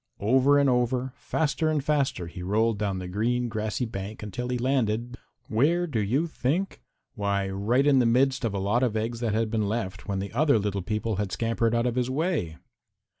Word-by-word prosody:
Over 130 +6 +4
and 140 -1 +4
over, 125 0 +1
faster 155 +2 -1
and 150 -3 0
faster, 140 - 0
he 85 +2 -8
rolled 105 +3 +1
down 100 -3 -1
the 90 -1 -5
green, 120 +6 0
grassy 110 +2 -2
bank 105 0 -6
until 120 +4 -4
he 125 - 0
landed 120 -2 0 0.3
where 160 +11 +2
do 140 -10 -2
you 120 +10 +1
think? 165 +4 -2 0.3
Why 100 -1 -1
right 105 +8 +1
in 140 -2 +5
the 120 - +3
midst 130 +2 +2
of 110 -4 -1
a - - -1
lot 105 +5 +1
of 120 -4 +1
eggs 115 +2 -2
that 115 -3 -1
had 110 -1 0
been 110 -3 0
left 105 -4 -4
when 100 - -1
the 100 +2 -4
other 140 0 +3
little 100 -2 -1
people 105 +2 -2
had 100 -2 -2
scampered 115 +1 0
out 115 +1 +1
of 125 - +1
his 125 0 0
way. 140 - -1
115 Hz, 205 wpm, -26 LUFS, 105-130 Hz, 0.3 s, in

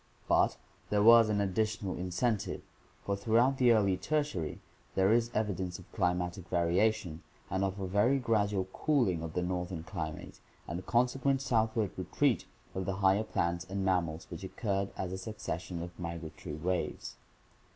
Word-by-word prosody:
But - - +3 0.3
there 105 0 +2
was 115 0 +8
an 105 -1 +1
additional 100 0 -1
incentive, 95 +5 -1 0.4
for 100 - 0
throughout 115 +6 +2
the 125 -2 +6
early 100 -4 +3
Tertiary 140 - -1 0.4
there 95 +2 +4
is 115 0 +2
evidence 95 -4 -1
of - - -15
climatic 90 +1 -1
variation 90 0 +1 0.3
and 95 +1 +1
of 95 0 -2
a 95 - -2
very 105 +8 +3
gradual 105 -6 +1
cooling 120 - +1
of 80 -1 -5
the 90 - 0
northern 90 -2 -3
climate 80 -4 -6 0.3
and 85 +2 -3
a - - -7
consequent 125 +5 +2
southward 110 -4 +1
retreat - - +1 0.3
of 95 -1 -3
the 95 - -1
higher 95 +2 +3
plants 85 -5 -1
and 95 0 -2
mam 90 -3 +2
mals 80 +1 -8
which 85 +3 -7
occurred 100 0 -2
as 90 -1 -3
a 95 - -4
succession 90 -4 -5
of 90 - -7
migratory 85 -3 -6
waves. 90 +4 -3
95 Hz, 160 wpm, -32 LUFS, 90-110 Hz, 0.4 s, was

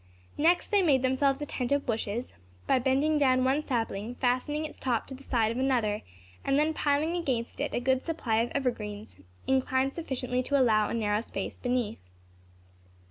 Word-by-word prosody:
Next, 340 +4 +3
they 410 -2 +4
made 280 -7 +3
themselves 270 +2 +2
a - - -2
tent 250 -3 -3
of 285 0 +2
bushes, 225 +1 -2 0.3
by 260 - +3
bending 280 +4 +2
down 255 -2 +3
one 270 +4 +2
sapling, 230 -4 -2
fastening 260 +5 0
its 305 - -9
top 245 -4 0
to - - -9
the 265 - -10
side 230 -5 +1
of 235 - -3
another, 240 -6 +1 0.4
and 275 0 +2
then 305 +2 +2
piling 305 +3 +1
against 260 -9 -2
it - - -1
a - - +1
good 260 +1 +1
supply 285 -9 -1
of 230 +2 +1
evergreens, 215 -6 -3 0.3
inclined 265 0 +1
sufficiently 255 -6 -2
to 280 +2 +1
allow 215 -4 +3
a - - -2
narrow 210 -2 +1
space 195 -4 -6
beneath. 245 - -1
260 Hz, 180 wpm, -29 LUFS, 235-285 Hz, 0.4 s, they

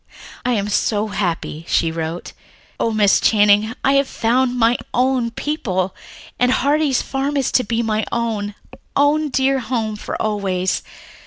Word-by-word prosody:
"I 250 - +1
am 205 -3 0
so 210 +1 0
happy," 175 -5 -3
she 165 - +2
wrote. 165 +1 -5 0.5
"Oh, - - +1
Miss 210 -3 +3
Channing, 210 +1 +3
I 275 - +3
have 280 - -7
found 250 +2 +1
'mine 235 0 +3 0.2
own 255 -1 +2
people,' 200 - -2 0.5
and 250 0 +3
Heartsease 285 0 +2
Farm 275 +2 -2
is 270 - 0
to 255 - +3
be 230 +1 -1
my 215 -1 0
own, 215 -3 -2 0.4
own 295 +2 +3
dear 270 0 +2
home 225 -3 -2
for 210 - -6
always. 195 -4 -1
225 Hz, 150 wpm, -19 LUFS, 205-260 Hz, 0.5 s, Miss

